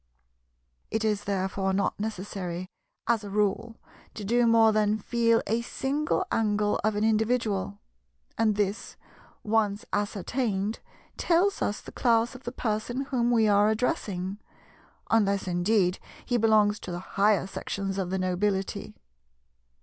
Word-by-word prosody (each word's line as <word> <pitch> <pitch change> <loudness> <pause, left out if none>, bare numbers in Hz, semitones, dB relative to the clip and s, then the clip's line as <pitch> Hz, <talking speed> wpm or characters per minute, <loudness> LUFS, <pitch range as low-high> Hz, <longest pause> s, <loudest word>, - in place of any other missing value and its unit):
It 220 0 -1
is 210 -1 0
therefore 190 0 -1
not 200 +1 0
necessary, 185 -4 -4 0.4
as 230 -2 +1
a 205 - -7
rule, 210 +3 -1 0.4
to 210 - -6
do 240 +3 +3
more 225 -1 +6
than 215 0 +2
feel 230 +1 +2
a 225 +2 0
single 290 +9 -1
angle 210 -2 +1
of 215 0 +1
an 205 - 0
individual; 220 - 0 0.6
and 215 -2 +2
this, 205 0 -2 0.5
once 210 -2 0
ascertained, 205 +1 -1 0.4
tells 365 +4 +2
us 205 - -1
the - - -11
class 235 0 +2
of 255 +1 -13
the 240 - -3
person 240 +1 -2
whom 240 -2 +1
we 225 -2 +4
are 205 0 +4
addressing, 205 - -2 0.7
unless 200 -3 +2
indeed 180 +1 +1 0.3
he 245 - -1
belongs 215 -2 +3
to - - -7
the 175 - -3 0.2
higher 200 -1 +3
sections 195 0 -4
of 185 -2 -2
the 190 - -1
nobility. 190 +1 -1
210 Hz, 135 wpm, -27 LUFS, 195-225 Hz, 0.7 s, more